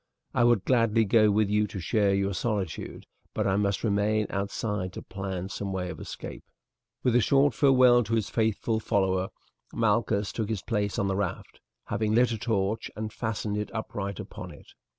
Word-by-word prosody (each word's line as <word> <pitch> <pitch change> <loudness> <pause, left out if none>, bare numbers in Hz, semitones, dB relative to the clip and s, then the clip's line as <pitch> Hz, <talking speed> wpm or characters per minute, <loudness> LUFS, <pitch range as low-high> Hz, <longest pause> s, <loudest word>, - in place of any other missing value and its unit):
I - - +3
would 120 -5 +3
gladly 115 -3 +3
go 110 +1 +5
with 105 +1 +3
you 105 +1 +2
to 100 - -6
share 100 +2 +2
your 100 0 0
solitude, 100 -2 -3 0.3
but - - 0
I 95 - +2
must 100 -1 0
remain 105 0 +1
outside 100 -1 -2
to - - -7
plan 95 -2 -5
some 100 -2 -4
way 90 -1 -3
of - - -9
escape." - - -8 0.6
With 125 -2 +2
a 120 - +5
short 140 +4 +3
farewell 130 -4 +5
to 115 +2 0
his 110 -3 0
faithful 110 0 0
follower 95 -4 +1 0.5
Malchus 105 -2 +1
took 110 -2 -3
his 105 -5 -2
place 105 -4 -1
on 100 - +1
the 95 - 0
raft, 100 -3 -4 0.3
having 110 0 0
lit 120 +1 +4
a 115 - -3
torch 110 -1 -1
and 110 0 -5
fastened 110 -2 -2
it 105 - -3
upright 100 -3 -4
upon - - -8
it. - - -14
105 Hz, 185 wpm, -27 LUFS, 100-115 Hz, 0.6 s, go